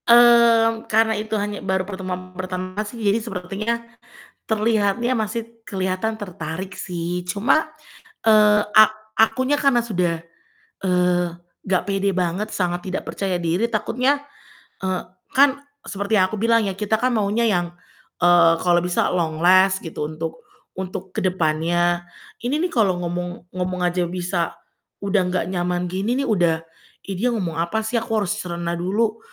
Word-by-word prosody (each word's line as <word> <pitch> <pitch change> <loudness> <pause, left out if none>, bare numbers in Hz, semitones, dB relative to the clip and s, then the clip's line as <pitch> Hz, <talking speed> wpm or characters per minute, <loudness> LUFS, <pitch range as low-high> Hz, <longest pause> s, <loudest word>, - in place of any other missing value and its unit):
Mmm, 235 -1 +6
karena 220 +1 +3
itu 215 0 -2
hanya 205 0 -3
baru 190 0 -1
pertemuan 185 -1 -6
pertama 185 +1 -4
sih 235 - -10
jadi 205 +3 +3
sepertinya, 200 +1 -3 0.7
terlihatnya 220 +2 +1
masih 220 +2 -2 0.2
keliatan 190 +3 -2
tertarik 185 -2 -6
sih 175 0 -4
cuma, 220 - +2 0.6
eee, 210 -1 +5 0.2
a - - +12 0.4
akunya 260 +6 +3
karena 275 -5 +3
sudah, 175 -7 -1 0.6
eee, 180 -1 +2 0.4
nggak 185 -1 +1
pede 195 0 +1
banget, 185 +3 -1
sangat 175 -2 -1
tidak - - -4
percaya 190 -3 -2
diri 175 +8 0
takutnya, 255 +6 +1 0.6
eee, 185 -1 -2 0.3
kan 280 0 +5 0.2
seperti 200 +2 -1
yang 185 - +5
aku - - -2
bilang 230 -1 +3
ya, 195 - -1
kita 210 +3 0
kan 250 +2 +1
maunya 215 +1 +1
yang, 180 -6 +2 0.5
eee, 175 -1 +6
kalau 175 -1 +4
bisa 180 0 0
long 165 -3 -1
last 185 +3 +4
gitu, 150 -2 -4
untuk 160 +1 -6 0.3
untuk 190 0 -6
ke - - -2
depannya. 175 0 +1 0.3
Ini 250 +5 0
nih 350 +3 -1
kalo 205 -7 +3
ngomong 175 0 -5
ngomong 185 0 -3
aja 175 0 0
bisa 175 -1 -2 0.5
udah 200 0 +2
gak 180 - 0
nyaman 180 -1 -1
gini 200 +6 -1
nih, - - -1
udah, 170 -6 +2 0.4
"Ih 195 -2 -4
dia 240 - +1
ngomong 175 -7 -3
apa 170 +7 0
sih? 220 +2 -1
Aku 225 0 -5
harus 200 +2 -2
cerna 170 -2 -3
dulu, 215 +5 0
190 Hz, 150 wpm, -22 LUFS, 180-220 Hz, 0.7 s, a